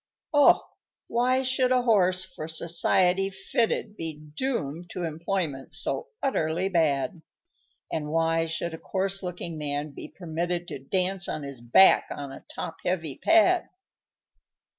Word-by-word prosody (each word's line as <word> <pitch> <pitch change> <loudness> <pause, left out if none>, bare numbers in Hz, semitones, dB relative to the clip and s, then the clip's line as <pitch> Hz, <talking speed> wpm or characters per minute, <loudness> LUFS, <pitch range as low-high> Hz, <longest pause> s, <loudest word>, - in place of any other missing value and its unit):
_ 290 - +4 0.2
_Oh! - - -12 0.5
why 255 +2 +1
should 260 0 +2
a 250 -1 +3
horse, 185 -5 +4
for 155 -4 -8
society 180 +3 +1
fitted, 205 +2 -1
Be 160 -5 -5 0.2
doomed 175 - -3
to 180 - -5
employment 160 -3 -3
so 470 - -1 0.2
utterly 175 - 0
bad, 160 -3 +1 0.7
And 150 -2 -2
why 165 +1 +2
should 165 +1 -3
a 160 - -7
coarse 195 0 -1
looking 175 -3 -5
man 145 0 -3
be - - -8
permitted 175 0 -3
To - - -6
dance 185 +6 0
on 155 - -3
his 140 -3 -7
back 120 +11 +6
on 140 -1 -6
a 135 - -10
top 165 - -6
heavy 165 -6 -2
pad? 335 +2 +4
175 Hz, 140 wpm, -27 LUFS, 155-195 Hz, 0.7 s, back